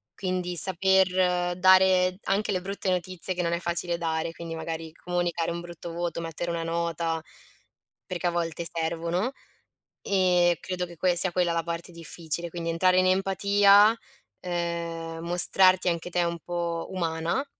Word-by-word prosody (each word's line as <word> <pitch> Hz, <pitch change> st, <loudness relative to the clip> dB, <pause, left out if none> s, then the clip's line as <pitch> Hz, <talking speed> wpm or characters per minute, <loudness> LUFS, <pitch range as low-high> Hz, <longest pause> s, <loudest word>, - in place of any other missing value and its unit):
quindi 180 Hz, -2 st, -3 dB
saper 185 Hz, -1 st, +4 dB
dare 185 Hz, 0 st, +4 dB
anche 200 Hz, +2 st, 0 dB
le 185 Hz, -2 st, -1 dB
brutte 195 Hz, +1 st, -4 dB
notizie 185 Hz, 0 st, -1 dB
che 180 Hz, -, -3 dB
non 170 Hz, -1 st, -1 dB
è 170 Hz, -, -1 dB
facile 170 Hz, 0 st, -2 dB
dare, 165 Hz, -1 st, -2 dB
quindi 165 Hz, -1 st, -7 dB
magari 160 Hz, 0 st, -6 dB
comunicare 175 Hz, -1 st, -2 dB
un 170 Hz, 0 st, -5 dB
brutto 170 Hz, -1 st, -9 dB
voto, 170 Hz, 0 st, -3 dB
mettere 165 Hz, +1 st, -4 dB
una 170 Hz, -1 st, -3 dB
nota, 165 Hz, -1 st, -2 dB, 0.8 s
perché 180 Hz, -1 st, -3 dB
a -, -, +1 dB
volte 170 Hz, 0 st, -3 dB
servono 170 Hz, +6 st, -2 dB, 0.7 s
e 180 Hz, -3 st, +2 dB
credo 180 Hz, -1 st, -4 dB
che 175 Hz, -1 st, -13 dB
que 180 Hz, +1 st, +1 dB
sia 185 Hz, +1 st, +6 dB
quella 180 Hz, -1 st, +1 dB
la 165 Hz, -, 0 dB
parte 170 Hz, +1 st, -5 dB
difficile, 170 Hz, 0 st, -4 dB
quindi 170 Hz, 0 st, -5 dB
entrare 185 Hz, +2 st, +3 dB
in 185 Hz, -, +3 dB
empatia, 200 Hz, +3 st, +4 dB, 0.5 s
ehm, 170 Hz, -2 st, -4 dB
mostrarti 185 Hz, +1 st, +3 dB
anche 170 Hz, 0 st, -3 dB
te 175 Hz, 0 st, 0 dB
un 170 Hz, 0 st, -2 dB
po' 170 Hz, 0 st, -4 dB
umana 170 Hz, -, -2 dB
175 Hz, 155 wpm, -26 LUFS, 170-185 Hz, 0.8 s, sia